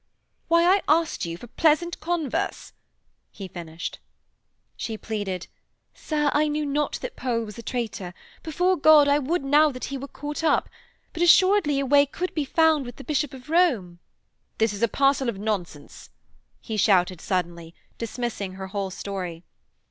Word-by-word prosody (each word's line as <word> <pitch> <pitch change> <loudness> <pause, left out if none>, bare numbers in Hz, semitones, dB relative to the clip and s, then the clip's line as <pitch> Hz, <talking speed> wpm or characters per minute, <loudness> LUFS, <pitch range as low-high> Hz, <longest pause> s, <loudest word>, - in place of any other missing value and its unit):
'Why, 335 0 +4
I 375 +3 +4
asked 320 - +2
you 165 0 -5
for 240 - -11
pleasant 320 +6 +1
converse,' 325 -6 -2 0.6
he 195 - -9
finished. 170 -2 -7 0.8
She 220 -1 -5
pleaded: 205 -5 -4 0.5
'Sir, 295 -2 -1
I 305 +1 +3
knew 300 0 -1
not 290 +1 -1
that - - -5
Pole 235 -3 -1
was 210 0 -9
a - - -5
traitor. 220 -6 -4 0.3
Before 355 +4 +1
God, 305 -3 +6
I 285 +1 +4
would 300 +4 -1
now 295 +3 +5
that 255 -3 -8
he 275 - -3
were 275 - -7
caught 295 +3 -6
up. 320 - +2 0.5
But 335 - -5
assuredly 345 -4 +5
a 275 - -1
way 285 +1 +5
could 360 +6 -4
be 305 -3 -1
found 320 0 +3
with 245 - -8
the 275 - -11
Bishop 295 -2 -1
of 255 -2 -12
Rome....' 240 - +2 0.6
'This 220 -1 +1
is 205 - -7
a 235 - +4
parcel 275 +2 +2
of 220 - -4
nonsense,' 190 -8 -5 0.5
he 220 -2 -5
shouted 185 -4 +3
suddenly, 170 -3 -3 0.2
dismissing 230 -4 -4
her 190 0 -7
whole 195 -1 -3
story. 185 -3 -6
265 Hz, 165 wpm, -25 LUFS, 200-305 Hz, 0.8 s, God